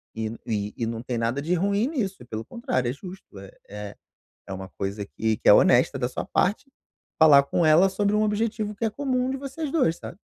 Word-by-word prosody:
e 110 0 -3
n 115 +2 -8
e 105 -2 -3
e 115 - -1
não 115 0 -5
tem 125 -1 -3
nada 115 +4 -1
de 165 +5 -1
ruim 200 +5 +1
nisso, 225 - -3
e - - -11
pelo 110 -1 -6
contrário, 235 - -2
é - - -2
justo 180 - -12
é 95 0 -11 0.2
é 105 0 -8 0.5
é - - -6
uma 95 0 -6
coisa 100 +1 -3
que 110 +2 -2
que - - -1
é - - +10
honesta - - +4
da - - -1
sua - - -5
parte, 215 +8 0 0.5
falar 150 -3 +7
com 160 +4 0
ela 160 +5 +6
sobre 205 +1 0
um 210 - +2
objetivo 215 0 -1
que 210 - -4
é - - -1
comum 255 0 -1
de 270 - -2
vocês 275 +3 -5
dois, 255 - +2
sabe? - - -9
170 Hz, 235 wpm, -25 LUFS, -, 0.5 s, é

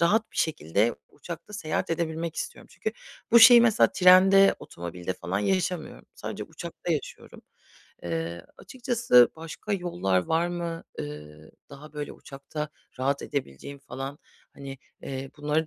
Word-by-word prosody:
rahat 215 +7 +2
bir - - -14
şekilde 110 - +1
uçakta 175 +4 -9
seyahat 160 -4 -2
edebilmek 165 0 -2
istiyorum. - - -6
Çünkü 220 - -4 0.4
bu 235 - +9
şeyi, 240 +1 +10
mesela 225 -2 +4
trende, 190 +2 +7
otomobilde 85 +1 -6
falan 90 +3 -3
yaşamıyorum. 180 - -2
Sadece - - -6
uçakta - - -5
yaşıyorum. - - -6 0.6
Eee, 85 0 -4
açıkçası 235 - +3
başka 165 +6 -6
yollar 175 - 0
var 165 +2 +1
mı, 170 -1 -4
eee, 75 +1 -8 0.2
daha, 150 +2 -12
böyle, 150 -1 -5
uçakta 140 +2 -7 0.3
rahat 140 +2 0
edebileceğim 140 - -5
falan, 135 +1 -7 0.4
hani, 135 -1 -8 0.2
eee, 135 0 -6
bunları 150 +2 0
150 Hz, 130 wpm, -27 LUFS, 120-180 Hz, 0.6 s, şeyi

